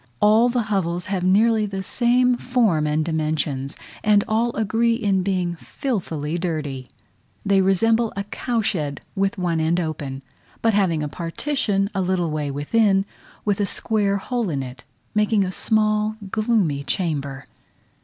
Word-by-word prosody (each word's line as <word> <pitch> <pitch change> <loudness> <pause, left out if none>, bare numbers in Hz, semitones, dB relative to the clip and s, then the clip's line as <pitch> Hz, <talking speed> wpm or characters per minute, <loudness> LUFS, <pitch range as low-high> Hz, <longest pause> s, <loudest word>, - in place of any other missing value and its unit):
All 220 +3 +5
the 240 -1 0
hovels 180 -5 -1
have 185 -2 -1
nearly 215 +3 +3
the 195 -1 -4
same 250 +4 +2
form 225 -12 +1
and 150 +1 +1
dimensions, 155 -4 -2 0.3
and 210 -1 +4
all 230 +2 +1
agree 225 +2 +2
in 200 -5 +1
being 180 -2 -1
filthily 170 - -3
dirty. 150 -7 -3 0.6
They 195 -1 +4
resemble 225 +4 +2
a 200 - -2
cow 230 +3 -2
shed 150 -9 -1
with 195 0 0
one 175 -3 0
end 165 +2 +1
open, 145 -5 -4 0.4
but 225 -1 +3
having 175 -6 +2
a - - -1
partition 195 - -1
a 195 - 0
little 180 -3 0
way 150 -2 -2
within, 195 +8 +2 0.4
with 205 -1 +1
a 205 - +1
square 205 -1 0
hole 235 +1 -2
in 140 -4 -2
it, 125 -1 -9 0.3
making 210 -1 +3
a 185 - -2
small 215 +1 +1 0.2
gloomy 215 -11 +1
chamber. 140 -5 -2
195 Hz, 150 wpm, -22 LUFS, 160-220 Hz, 0.6 s, All